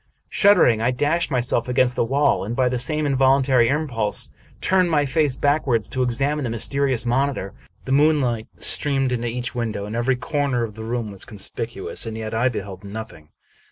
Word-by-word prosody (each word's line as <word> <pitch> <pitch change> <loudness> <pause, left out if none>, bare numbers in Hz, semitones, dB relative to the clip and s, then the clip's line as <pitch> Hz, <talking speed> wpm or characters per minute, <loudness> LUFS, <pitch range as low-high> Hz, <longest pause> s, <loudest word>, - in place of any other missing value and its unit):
Shuddering, 180 - +4
I 115 - +2
dashed 145 +7 0
myself 125 -3 0
against 125 0 +2
the - - +1
wall, 135 +1 +1
and, 110 +4 -4
by 130 -1 +2
the 125 0 -2
same 150 +5 0
involuntary 135 -2 +3
impulse, 135 -8 0 0.3
turned 185 -1 +2
my 150 -3 +2
face 145 -1 +1
backward 140 -6 +1
to 130 +5 -3
ex 125 0 -1
amine 145 +2 0
the 125 - -2
mysterious 130 +2 -1
monitor. 130 -4 -1 0.3
The 130 - -4
moonlight 135 -6 +2
streamed 135 -3 0
into 120 -1 -1
each 120 +1 -3
window, 110 -4 -3
and 105 +2 -6
every 120 +3 +1
corner 135 -1 -1
of 110 -2 -5
the 110 +1 -8
room 115 -2 -3
was 100 - -9
con 105 - -11
spicuous, 115 +4 -4
and 110 0 -5
yet 110 -1 -5
I 120 +3 +2
beheld 100 -5 -6
nothing! 100 -7 -9
125 Hz, 190 wpm, -22 LUFS, 115-140 Hz, 0.3 s, Shuddering